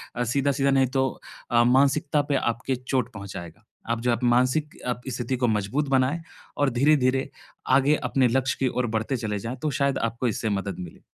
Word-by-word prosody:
अ, 120 Hz, -, 0 dB
सीधा-सीधा 140 Hz, +3 st, +1 dB
नहीं 135 Hz, -1 st, +3 dB
तो 130 Hz, -, +2 dB, 0.4 s
अ, 120 Hz, 0 st, +5 dB
मानसिकता 140 Hz, +4 st, +3 dB
पे -, -, +3 dB
आपके 120 Hz, +1 st, -1 dB
चोट 125 Hz, -1 st, -2 dB
पहुँचाएगा। 100 Hz, -2 st, -9 dB, 0.3 s
आप 115 Hz, -, 0 dB
जो 125 Hz, +1 st, +1 dB
आप 120 Hz, +1 st, -1 dB
मानसिक 130 Hz, +5 st, +2 dB
आपकी 125 Hz, +1 st, -3 dB
स्थिति 120 Hz, +1 st, -2 dB
को 125 Hz, -, +1 dB
मज़बूत 110 Hz, +7 st, 0 dB
बनाए 135 Hz, +5 st, +2 dB, 0.4 s
और 145 Hz, -1 st, +2 dB
धीरे-धीरे 135 Hz, -1 st, +3 dB, 0.5 s
आगे 140 Hz, +2 st, +3 dB
अपने 130 Hz, -2 st, +3 dB
लक्ष्य 130 Hz, +2 st, 0 dB
की 135 Hz, -, +2 dB
ओर 125 Hz, -, +1 dB
बढ़ते 110 Hz, +5 st, -2 dB
चले 105 Hz, -3 st, -3 dB
जाएँ, 115 Hz, +5 st, -5 dB
तो 155 Hz, -, -1 dB
शायद 140 Hz, -1 st, +1 dB
आपको 120 Hz, +2 st, -3 dB
इससे 110 Hz, 0 st, -2 dB
मदद 100 Hz, -2 st, -5 dB
मिले। 90 Hz, -2 st, -9 dB
130 Hz, 190 wpm, -25 LUFS, 115-135 Hz, 0.5 s, अ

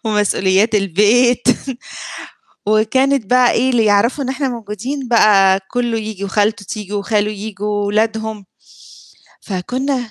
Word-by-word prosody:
ومسؤوليات 205 Hz, 0 st, +1 dB
البيت 210 Hz, +6 st, +3 dB, 1.3 s
وكانت 245 Hz, +4 st, +2 dB
بقى 250 Hz, +3 st, +4 dB
إيه، 260 Hz, -, +1 dB
اللي 235 Hz, -4 st, +2 dB
يعرفوا 215 Hz, +7 st, +2 dB
إن 260 Hz, -, -4 dB
إحنا 270 Hz, +1 st, -2 dB
موجودين 240 Hz, +4 st, -5 dB
بقى 195 Hz, -5 st, +4 dB
كُلّه 240 Hz, -2 st, -1 dB
ييجي 215 Hz, -2 st, -6 dB
وخالته 205 Hz, +1 st, 0 dB
تيجي 210 Hz, 0 st, -7 dB
وخاله 205 Hz, +1 st, 0 dB
ييجي 210 Hz, 0 st, -7 dB
وولادهم. 210 Hz, +1 st, -1 dB, 1.0 s
فكُنّا 245 Hz, +5 st, -3 dB
215 Hz, 115 wpm, -17 LUFS, 205-245 Hz, 1.3 s, بقى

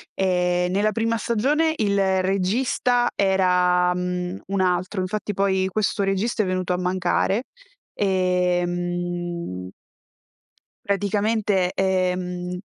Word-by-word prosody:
Ehm, 180 Hz, -1 st, +1 dB
nella 210 Hz, +2 st, +2 dB
prima 230 Hz, +1 st, 0 dB
stagione 290 Hz, +9 st, +1 dB
il 195 Hz, -3 st, +2 dB
regista 240 Hz, +6 st, +1 dB
era, 180 Hz, -2 st, +3 dB
mhmm, 180 Hz, +1 st, -3 dB
un 195 Hz, 0 st, -1 dB
altro, 185 Hz, +1 st, 0 dB
infatti 205 Hz, +3 st, -3 dB
poi 190 Hz, -1 st, +1 dB
questo 205 Hz, 0 st, 0 dB
regista 195 Hz, +4 st, 0 dB
è -, -, -2 dB
venuto 185 Hz, -1 st, -1 dB
a -, -, 0 dB
mancare 185 Hz, +4 st, 0 dB, 0.5 s
e, 180 Hz, -2 st, +1 dB
mhmm 175 Hz, -, -4 dB, 1.2 s
praticamente, 200 Hz, -1 st, +1 dB
ehm 180 Hz, -1 st, -1 dB
185 Hz, 105 wpm, -23 LUFS, 180-200 Hz, 1.2 s, era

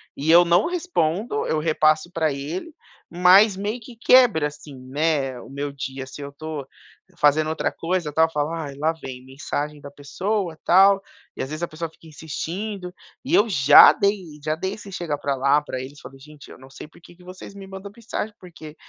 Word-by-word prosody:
e 145 Hz, +3 st, -3 dB
eu 175 Hz, +1 st, +8 dB
não 175 Hz, +3 st, +3 dB
respondo, 225 Hz, -, -1 dB
eu 155 Hz, -, 0 dB
repasso 155 Hz, +1 st, +1 dB
pra 160 Hz, -4 st, 0 dB
ele, 160 Hz, -, -6 dB, 0.4 s
mas 185 Hz, +4 st, +5 dB
meio 210 Hz, +5 st, -3 dB
que 235 Hz, +1 st, -13 dB
quebra 230 Hz, -9 st, +4 dB
assim, 145 Hz, -1 st, -12 dB
né, 140 Hz, -3 st, -1 dB
o -, -, -13 dB
meu 140 Hz, +1 st, -5 dB
dia 135 Hz, -1 st, -6 dB
se 135 Hz, +2 st, -11 dB
eu 140 Hz, -, -6 dB
estou 145 Hz, -1 st, -7 dB, 0.5 s
fazendo 150 Hz, +1 st, +3 dB
outra 160 Hz, -, -1 dB
coisa 170 Hz, -2 st, -3 dB
tal 160 Hz, +2 st, +3 dB
falar 150 Hz, -1 st, -3 dB
lá 155 Hz, +3 st, +1 dB
vem 125 Hz, -1 st, -8 dB
mensagem 145 Hz, +2 st, -5 dB
da 145 Hz, -, -9 dB
pessoa 175 Hz, +5 st, -3 dB
tal, 195 Hz, +2 st, +5 dB, 0.4 s
e -, -, -4 dB
às 135 Hz, -, -6 dB
vezes 155 Hz, +2 st, -5 dB
a -, -, 0 dB
pessoa 165 Hz, +1 st, -6 dB
fica 160 Hz, -, -19 dB
insistindo, 180 Hz, +5 st, -6 dB, 0.3 s
e 275 Hz, +5 st, -4 dB
eu 210 Hz, -, +4 dB
já 145 Hz, -5 st, +8 dB
dei 200 Hz, -1 st, 0 dB, 0.2 s
já 155 Hz, 0 st, -1 dB
dei 190 Hz, +4 st, -4 dB
esse 205 Hz, -1 st, -11 dB
chega 170 Hz, -5 st, -3 dB
pra 140 Hz, -1 st, -2 dB
lá 140 Hz, +3 st, +3 dB
pra 140 Hz, -3 st, -6 dB
eles 135 Hz, +3 st, -9 dB
falei: 135 Hz, +1 st, -13 dB
"Gente 150 Hz, 0 st, -15 dB
eu -, -, -12 dB
não 130 Hz, +1 st, -15 dB
sei 135 Hz, -, -11 dB
porque 170 Hz, +2 st, -18 dB
que 180 Hz, -, -20 dB
vocês 185 Hz, +2 st, -11 dB
me 195 Hz, -, -10 dB
mandam 195 Hz, +1 st, -9 dB
mensagem 220 Hz, -2 st, -5 dB
porque 160 Hz, -4 st, -12 dB
160 Hz, 195 wpm, -23 LUFS, 145-190 Hz, 0.5 s, eu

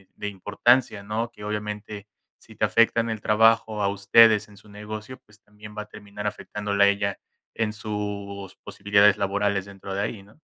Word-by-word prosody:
de 105 Hz, -, -5 dB
importancia, 105 Hz, +3 st, +1 dB
¿no? 110 Hz, +3 st, -3 dB
Que 105 Hz, -, -13 dB
obviamente, 105 Hz, 0 st, -5 dB, 0.3 s
si -, -, -17 dB
te -, -, +1 dB
afecta 115 Hz, 0 st, +3 dB
en 115 Hz, 0 st, -3 dB
el 110 Hz, -1 st, -5 dB
trabajo 110 Hz, 0 st, +3 dB
a -, -, +2 dB
ustedes 105 Hz, +2 st, +5 dB
en 105 Hz, -1 st, -18 dB
su 105 Hz, -, -19 dB
negocio, 105 Hz, +4 st, -8 dB
pues, 105 Hz, 0 st, -22 dB
también 105 Hz, 0 st, -14 dB
va 105 Hz, -, -3 dB
a -, -, -16 dB
terminar 105 Hz, -1 st, -10 dB
afectándola 105 Hz, -1 st, 0 dB
a -, -, +5 dB
ella, 100 Hz, 0 st, 0 dB, 0.3 s
en 110 Hz, -1 st, -1 dB
sus 100 Hz, -2 st, -6 dB
posibilidades 100 Hz, 0 st, +3 dB
laborales 100 Hz, -1 st, 0 dB
dentro 100 Hz, -1 st, -9 dB
de 100 Hz, -, -1 dB
ahí, 105 Hz, -1 st, -4 dB
¿no? 105 Hz, +8 st, -22 dB
105 Hz, 180 wpm, -25 LUFS, 100-105 Hz, 0.3 s, ustedes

